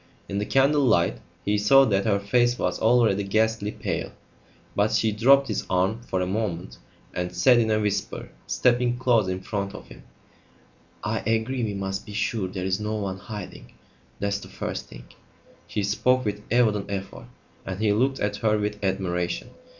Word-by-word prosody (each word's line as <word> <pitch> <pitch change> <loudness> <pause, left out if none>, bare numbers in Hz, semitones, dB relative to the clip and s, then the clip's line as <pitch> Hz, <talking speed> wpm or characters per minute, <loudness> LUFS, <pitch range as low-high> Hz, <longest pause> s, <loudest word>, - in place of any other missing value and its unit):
In 100 - -2
the 105 - -2
candle 140 +2 +3
light 85 - +2 0.3
he 105 +1 +1
saw 135 +7 +6
that 100 -4 +1
her 105 -3 +3
face 120 +4 +2
was - - -1
already 110 -3 +3
ghastly 110 +1 +1
pale; - - -3 0.6
but 105 +2 +2
she 110 0 +2
dropped 135 +6 +5
his 110 - -2
arm 95 +5 +1
for 95 -6 -2
a - - +1
moment 95 -2 -3 0.3
and 90 0 -3
said 125 -2 +5
in 110 -1 +1
a 110 0 +2
whisper, 105 -1 -2 0.2
stepping 120 0 +2
close 120 -5 +3
in 95 0 -3
front 100 0 -4
of - - -11
him - - -13 1.0
"I - - -1
agree. 115 +3 -1
We 105 -2 -2
must 95 0 -4
be 105 - -8
sure 105 -1 -1
there's 95 +1 -2
no 105 +1 -2
one 100 -3 -3
hiding. 105 -2 -9 0.5
That's 100 0 -1
the - - -11
first - - -5
thing." - - -12 0.6
She 105 - -2
spoke 125 +5 +2
with 105 0 -2
evident 110 -4 +2
effort, 100 -1 -6 0.4
and 95 0 -5
he 105 -1 +2
looked 135 +5 +1
at 105 0 -1
her 110 -2 +2
with 105 0 -3
admiration. 90 -2 -2
105 Hz, 175 wpm, -25 LUFS, 95-115 Hz, 1.0 s, saw